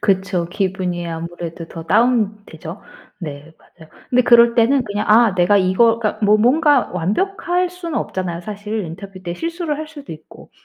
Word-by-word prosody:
그쵸. 190 Hz, -3 st, 0 dB
기분이 180 Hz, -2 st, -2 dB
아무래도 165 Hz, 0 st, -6 dB
더 165 Hz, -1 st, -9 dB
다운되죠. 210 Hz, -4 st, 0 dB, 0.4 s
네 150 Hz, -1 st, -8 dB
맞아요. 160 Hz, -2 st, -19 dB, 0.2 s
근데 250 Hz, 0 st, +4 dB
그럴 235 Hz, -1 st, +6 dB
때는 250 Hz, +3 st, +3 dB
그냥 205 Hz, 0 st, -3 dB
'아 220 Hz, -1 st, +5 dB
내가 185 Hz, +3 st, +3 dB
이거' 200 Hz, +5 st, +3 dB
그러니까 215 Hz, -1 st, -2 dB
뭐 210 Hz, +1 st, +5 dB
뭔가 280 Hz, +4 st, +3 dB
완벽할 350 Hz, -, -1 dB
수는 350 Hz, -3 st, -4 dB
없잖아요. 175 Hz, -2 st, -4 dB
사실 210 Hz, +1 st, -5 dB
인터뷰 185 Hz, +3 st, -9 dB
때 175 Hz, -1 st, -4 dB
실수를 330 Hz, -, -3 dB
할 310 Hz, 0 st, -6 dB
수도 290 Hz, -, -10 dB
있고. 155 Hz, 0 st, -14 dB
205 Hz, 345 characters per minute, -19 LUFS, 175-245 Hz, 0.4 s, 그럴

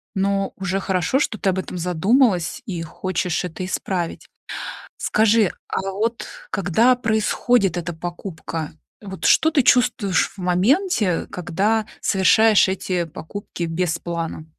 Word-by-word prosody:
но 195 Hz, 0 st, 0 dB
уже 195 Hz, 0 st, -2 dB
хорошо, 190 Hz, +6 st, 0 dB
что 225 Hz, -6 st, -1 dB
ты 195 Hz, -, 0 dB
об 190 Hz, -, -2 dB
этом 185 Hz, -, -5 dB
задумалась 180 Hz, -, +1 dB
и 175 Hz, -5 st, -4 dB
хочешь 180 Hz, +1 st, -2 dB
это 180 Hz, +1 st, -6 dB
исправить. 180 Hz, -2 st, -3 dB, 0.7 s
Скажи, 220 Hz, -2 st, +3 dB, 0.2 s
а -, -, -1 dB
вот 225 Hz, +4 st, -2 dB, 0.2 s
когда 220 Hz, +7 st, +3 dB
происходит 220 Hz, -3 st, +1 dB
эта 175 Hz, 0 st, -3 dB
покупка, 165 Hz, -2 st, -6 dB, 0.3 s
вот 190 Hz, -3 st, -7 dB
что 320 Hz, -, +5 dB
ты 300 Hz, -5 st, +2 dB
чувствуешь 230 Hz, -8 st, +3 dB
в -, -, -21 dB
моменте, 210 Hz, -, +2 dB
э, 180 Hz, -3 st, 0 dB
когда 200 Hz, +5 st, -1 dB
совершаешь 210 Hz, +3 st, +4 dB
эти 185 Hz, -2 st, -1 dB
покупки 170 Hz, +3 st, -7 dB
без 165 Hz, 0 st, -1 dB
плана? 165 Hz, -2 st, -5 dB
190 Hz, 130 wpm, -21 LUFS, 175-220 Hz, 0.7 s, что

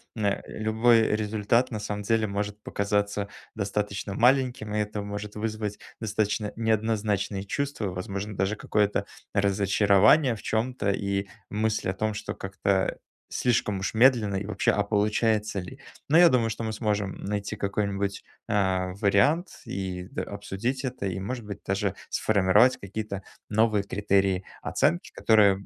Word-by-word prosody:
н 110 Hz, -, -2 dB
э, 100 Hz, -, +1 dB
любой 110 Hz, +1 st, +3 dB
результат 110 Hz, +3 st, +1 dB
на 110 Hz, -, -3 dB
самом 105 Hz, 0 st, -4 dB
деле 110 Hz, +1 st, +2 dB
может 105 Hz, +1 st, -3 dB
показаться 100 Hz, 0 st, -1 dB, 0.3 s
достаточно 100 Hz, -1 st, -2 dB
маленьким. 125 Hz, -2 st, +2 dB
И 105 Hz, -, +1 dB
это 105 Hz, 0 st, -2 dB
может 105 Hz, +1 st, -6 dB
вызвать 105 Hz, -1 st, -3 dB, 0.2 s
достаточно 105 Hz, 0 st, -1 dB
неоднозначные 105 Hz, -3 st, 0 dB
чувства. 140 Hz, -3 st, -2 dB
Возможно, 100 Hz, +3 st, -5 dB
даже 95 Hz, +2 st, +1 dB
какое-то 100 Hz, -1 st, +1 dB, 0.3 s
разочарование 100 Hz, +6 st, +4 dB
в 105 Hz, -, -11 dB
чём-то, 110 Hz, -2 st, 0 dB
и 100 Hz, 0 st, -1 dB, 0.2 s
мысль 110 Hz, -1 st, 0 dB
о 95 Hz, -, 0 dB
том, 110 Hz, +2 st, -1 dB
что 105 Hz, -, -4 dB
как-то 95 Hz, 0 st, -1 dB, 0.4 s
слишком 110 Hz, -5 st, +1 dB
уж 95 Hz, -, -2 dB
медленно 115 Hz, -4 st, +4 dB
и 95 Hz, +1 st, -2 dB
вообще, 110 Hz, -, +1 dB
а 100 Hz, -, +1 dB
получается 105 Hz, 0 st, +1 dB
ли? 130 Hz, +9 st, -10 dB, 0.3 s
Но 160 Hz, -, +5 dB
я 175 Hz, 0 st, +9 dB
думаю, 120 Hz, -7 st, +3 dB
что 115 Hz, +1 st, -4 dB
мы 110 Hz, -, -2 dB
сможем 105 Hz, -3 st, -1 dB
найти 105 Hz, +1 st, -3 dB
какой-нибудь, 100 Hz, -1 st, -2 dB, 0.2 s
а, 95 Hz, -2 st, +1 dB
вариант 105 Hz, -, +2 dB
и 95 Hz, -1 st, -4 dB
д -, -, -3 dB
обсудить 110 Hz, +6 st, -3 dB
это 125 Hz, -6 st, -3 dB
и, 95 Hz, -1 st, -2 dB
может 120 Hz, +2 st, -4 dB
быть, 100 Hz, -2 st, -6 dB
даже 100 Hz, 0 st, -1 dB
сформировать 105 Hz, +4 st, +4 dB
какие-то 100 Hz, 0 st, -5 dB, 0.2 s
новые 110 Hz, -1 st, +2 dB
критерии 100 Hz, -2 st, +1 dB, 0.2 s
оценки, 85 Hz, -, 0 dB
которые 100 Hz, -3 st, +4 dB
105 Hz, 145 wpm, -27 LUFS, 100-110 Hz, 0.4 s, я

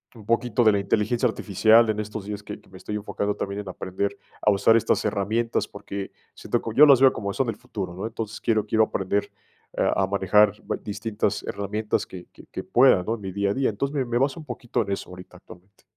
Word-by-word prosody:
un 110 Hz, -3 st, -13 dB
poquito 120 Hz, 0 st, +1 dB
de 110 Hz, -, +6 dB
la 100 Hz, -, +1 dB
inteligencia 110 Hz, +5 st, +1 dB
artificial 110 Hz, +1 st, +3 dB
en 105 Hz, 0 st, 0 dB
estos 105 Hz, -1 st, -5 dB
días, 105 Hz, 0 st, -6 dB
que 105 Hz, -, -8 dB
que -, -, -24 dB
me 95 Hz, -, -13 dB
estoy 105 Hz, -, -6 dB
enfocando 105 Hz, 0 st, -2 dB
también 100 Hz, +1 st, -4 dB
en 95 Hz, -, -9 dB
aprender 100 Hz, +2 st, -3 dB, 0.2 s
a 105 Hz, -, +4 dB
usar 110 Hz, +3 st, +4 dB
estas -, -, +1 dB
herramientas, 110 Hz, +3 st, 0 dB
porque 100 Hz, 0 st, -7 dB, 0.2 s
siento 120 Hz, -, -2 dB
que 115 Hz, -, -5 dB
yo 150 Hz, -, +9 dB
las 135 Hz, -3 st, +6 dB
veo 135 Hz, -, +7 dB
como 100 Hz, -1 st, -4 dB
son 130 Hz, -4 st, 0 dB
el 110 Hz, -, -2 dB
futuro, 95 Hz, -5 st, -6 dB
¿no?, 95 Hz, -, -5 dB
entonces, 115 Hz, -1 st, -6 dB
quiero 110 Hz, -3 st, +1 dB
quiero 110 Hz, +1 st, +3 dB
aprender, 100 Hz, 0 st, -2 dB, 0.4 s
eh, -, -, +1 dB
a 95 Hz, -1 st, +1 dB
manejar 100 Hz, +1 st, +3 dB, 0.3 s
distintas 105 Hz, +1 st, -2 dB
herramientas 105 Hz, +2 st, -2 dB
que 90 Hz, -2 st, -10 dB
que -, -, -16 dB
que -, -, -5 dB
pueda, 125 Hz, -7 st, +4 dB
¿no?, 110 Hz, +5 st, -1 dB
en 105 Hz, -, -12 dB
mi 95 Hz, -1 st, -5 dB
día 100 Hz, +1 st, 0 dB
a -, -, 0 dB
día, 135 Hz, 0 st, +1 dB
entonces, 140 Hz, +7 st, -3 dB
me 135 Hz, -2 st, 0 dB
me 120 Hz, 0 st, -1 dB
baso 135 Hz, +5 st, 0 dB
un 155 Hz, -, -10 dB
poquito 120 Hz, -1 st, -3 dB
en 100 Hz, -, -4 dB
eso 100 Hz, -, -4 dB
ahorita, 90 Hz, 0 st, -12 dB
actualmente. 95 Hz, +3 st, -17 dB
105 Hz, 230 wpm, -24 LUFS, 100-115 Hz, 0.4 s, yo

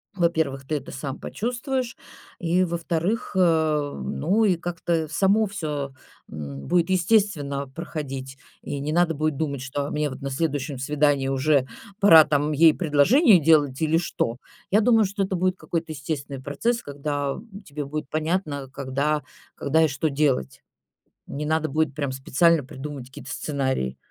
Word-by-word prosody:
во-первых, 160 Hz, -7 st, 0 dB
ты 155 Hz, -, -1 dB
это 140 Hz, -2 st, -5 dB
сам 135 Hz, 0 st, -5 dB
почувствуешь. 250 Hz, +2 st, -3 dB, 0.4 s
И, 175 Hz, +1 st, +2 dB
во-вторых, 170 Hz, +6 st, -2 dB
э, 155 Hz, -4 st, +2 dB
ну, 195 Hz, +9 st, +1 dB
и 195 Hz, -4 st, +4 dB
как-то 170 Hz, -1 st, -2 dB
само 195 Hz, +8 st, +2 dB
всё, 150 Hz, -9 st, -4 dB, 0.4 s
м, 70 Hz, -3 st, -7 dB
будет 175 Hz, -1 st, +2 dB
естественно 175 Hz, -7 st, +1 dB
проходить. 135 Hz, -3 st, -6 dB, 0.3 s
И 140 Hz, -, -4 dB
не 145 Hz, +2 st, -3 dB
надо 170 Hz, 0 st, +3 dB
будет 155 Hz, -1 st, -1 dB
думать, 140 Hz, -4 st, -2 dB
что: 135 Hz, +2 st, -3 dB
"А -, -, -5 dB
мне 150 Hz, 0 st, 0 dB
вот 130 Hz, -, -9 dB
на 140 Hz, 0 st, -4 dB
следующем 145 Hz, -1 st, -2 dB
свидании 145 Hz, 0 st, +1 dB
уже 135 Hz, 0 st, +2 dB, 0.3 s
пора 165 Hz, -6 st, +9 dB
там 145 Hz, 0 st, +1 dB
ей 160 Hz, +1 st, +6 dB
предложение 185 Hz, -, +5 dB
делать 145 Hz, -4 st, +3 dB
или 160 Hz, +1 st, +3 dB
что?" 125 Hz, -8 st, -2 dB, 0.3 s
Я 210 Hz, +3 st, +5 dB
думаю, 225 Hz, -1 st, +4 dB
что 200 Hz, +1 st, -2 dB
это 190 Hz, 0 st, -2 dB
будет 185 Hz, +1 st, 0 dB
какой-то 165 Hz, -2 st, -4 dB
естественный 140 Hz, -2 st, -5 dB
процесс, 230 Hz, -, -1 dB
когда 145 Hz, -1 st, -3 dB, 0.3 s
тебе 145 Hz, 0 st, -5 dB
будет 150 Hz, 0 st, -5 dB
понятно, 155 Hz, -3 st, -2 dB
когда 140 Hz, +3 st, -1 dB, 0.3 s
когда 160 Hz, +3 st, +2 dB
и -, -, +3 dB
что 145 Hz, +2 st, -1 dB
делать. 140 Hz, -, 0 dB, 0.7 s
Не 150 Hz, +2 st, -4 dB
надо 160 Hz, 0 st, 0 dB
будет 155 Hz, 0 st, 0 dB
прям 140 Hz, -3 st, -2 dB
специально 145 Hz, +4 st, +2 dB
придумывать 140 Hz, -1 st, -7 dB
какие-то 130 Hz, -, -11 dB
сценарии. 130 Hz, -, -2 dB
150 Hz, 155 wpm, -24 LUFS, 140-170 Hz, 0.7 s, пора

